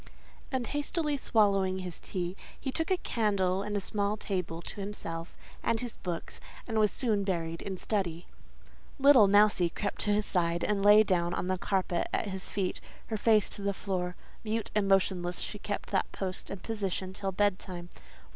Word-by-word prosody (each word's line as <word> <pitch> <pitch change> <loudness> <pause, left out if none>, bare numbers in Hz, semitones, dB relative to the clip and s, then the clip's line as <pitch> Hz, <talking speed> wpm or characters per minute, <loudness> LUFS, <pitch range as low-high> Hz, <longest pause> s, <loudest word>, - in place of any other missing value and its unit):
And 260 -3 0
hastily 295 +2 0
swallowing 200 -7 +2
his 180 -2 -5
tea, 180 0 -3 0.2
he 270 - -3
took 325 +4 -1
a 375 - +3
candle 200 - +1
and 205 0 -2
a - - +1
small 205 +1 -1
table 180 -5 -3
to - - -7
himself 170 -4 -6 0.2
and 230 -1 +1
his 245 -2 -3
books, 175 -2 -5 0.3
and 225 -2 0
was 210 -1 +5
soon 215 -5 +1
buried 165 -4 -2
in 190 -1 -4
study. 180 -5 -2 0.7
"Little 275 -6 +7
Mousie" 205 -3 +5
crept 200 +4 -3
to 210 - +1
his 205 0 +2
side, 170 -2 0
and 205 -2 +1
lay 210 +1 +8
down 175 -3 +1
on - - -2
the 185 0 0
carpet 185 -3 0
at - - 0
his 190 0 -5
feet, 190 -3 -2 0.3
her 220 - -1
face 215 -1 +4
to - - -6
the 200 0 -1
floor; 180 -3 -2 0.3
mute 220 0 -2
and 210 -2 +2
motionless 185 -2 +2
she 210 - -4
kept 205 +1 -4
that 195 - +1
post 185 -1 -4
and 195 -2 -7
position 195 -4 -2
till 195 0 -3
bed 200 0 +2
time. 175 -2 -7
195 Hz, 185 wpm, -30 LUFS, 185-215 Hz, 0.7 s, lay